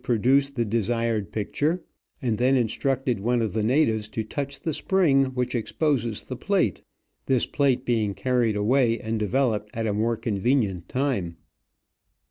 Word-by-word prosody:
187 120 - 0 0.2
produce 140 0 +4
the 125 -4 -2
desired 115 -2 -1
picture, 150 - -1 0.4
and 115 -3 0
then 130 +2 +3
instructed 130 0 0
one 120 +4 +1
of 110 -4 -1
the 110 - 0
natives 110 -3 +1
to 110 - -3
touch 140 +5 -5
the 160 - -2
spring 150 -7 +3
which 125 -1 -2
exposes 120 -2 -1
the 130 - -6
plate, 175 - 0 0.5
this 130 -3 +2
plate 135 -3 +1
being 110 -5 0
carried 125 -4 +1
away 115 +2 +2
and 110 -2 -3
developed 105 -1 0
at 115 0 -2
a 105 - 0
more 115 +2 0
convenient 105 -4 0
time. 125 -11 -1
120 Hz, 155 wpm, -25 LUFS, 110-135 Hz, 0.5 s, produce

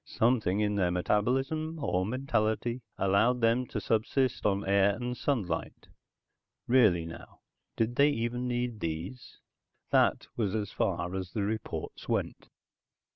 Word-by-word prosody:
Something 110 -4 +1
in 105 -1 +1
their 90 -3 +2
metabolism 135 - 0
(or 95 -9 0
mentality?) 120 -1 -1 0.2
allowed 100 +6 +3
them 115 +2 +2
to - - -3
subsist 120 +2 0
on 100 -1 +1
the - - -7
air 100 0 +4
and 125 +2 -4
sunlight. 105 - -2 0.8
(Really 110 -10 +4
now? 80 0 -11 0.3
Did 115 +2 -1
they 140 +1 +6
even 120 -2 -2
need 120 -2 -2
these?) 85 +10 -5 0.5
That - - +3
was 105 -3 -1
as 105 -2 -2
far 90 -1 -1
as 95 -2 -4
the 105 - -1
reports 100 -6 -4
went. - - -2
110 Hz, 135 wpm, -30 LUFS, 95-125 Hz, 0.8 s, they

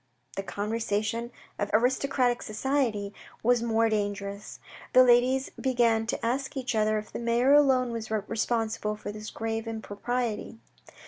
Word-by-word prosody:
The - - -2
conversation 215 +3 -2 0.3
of 205 - -1
aristocratic 250 +1 +2
society 215 -4 -1 0.3
was 240 +1 +3
more 230 -1 +2
dangerous. 205 -1 -3 0.3
The 255 - +8
ladies 255 +2 +3
began 235 -4 +2
to 230 - -2
ask 265 +4 -2
each 260 -1 -2
other 215 0 +2
if 215 - -7
the - - -4
mayor 235 +3 +3
alone 265 -4 +4
was 230 -1 -5
responsible 220 0 -1
for 210 - -6
this 215 +1 -7
grave 225 0 -3
impropriety. 225 +1 -3
225 Hz, 135 wpm, -28 LUFS, 215-245 Hz, 0.3 s, The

